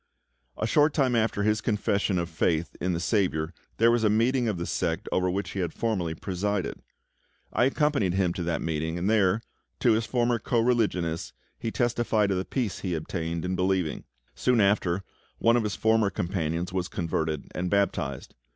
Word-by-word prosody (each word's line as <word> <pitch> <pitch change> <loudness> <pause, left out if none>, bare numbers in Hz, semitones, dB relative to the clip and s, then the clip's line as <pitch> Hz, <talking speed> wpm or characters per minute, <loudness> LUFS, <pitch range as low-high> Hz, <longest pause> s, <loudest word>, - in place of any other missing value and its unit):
A - - -1
short 150 +6 +3
time 130 -5 +2
after 110 -2 +1
his 110 +1 +2
confession 100 -3 0
of 85 -1 -1
faith 80 0 0
in 90 +1 0
the 85 - -1
SAVIOUR 85 -5 0 0.2
there 115 +1 +5
was 120 -1 +2
a 105 - +4
meeting 120 +3 +2
of 105 -5 -1
the 85 - -3
sect 85 +2 -2
over 90 0 +1
which 100 +3 -2
he 100 - -4
had 90 -2 -2
formerly 95 -8 -1
presided. 100 +2 -2 0.7
I 120 - +3
accompanied 135 - +1
him 95 -3 +2
to 90 - -4
that 85 -1 -1
meeting, 80 +1 -2
and 90 +2 -1
there, 105 0 +3 0.4
to 120 - +5
his 110 0 +1
former 120 0 +1
co 120 - 0
religionists, 105 -9 0 0.3
he 115 - -2
testified 115 -3 +1
of 95 - +1
the 95 - -3
peace 120 -7 -2
he 90 -3 -2
had 80 -2 -2
obtained 85 0 -3
in 90 +1 -1
believing. 90 -3 0 0.3
Soon 125 -2 +2
after, 100 -2 +2 0.3
one 115 +1 +4
of 120 - +3
his 105 -2 -2
former 110 -2 +3
companions 85 -1 -2
was 90 -2 -1
converted 80 -6 -2
and 90 0 -2
baptized. 80 -9 -1
100 Hz, 190 wpm, -27 LUFS, 85-115 Hz, 0.7 s, there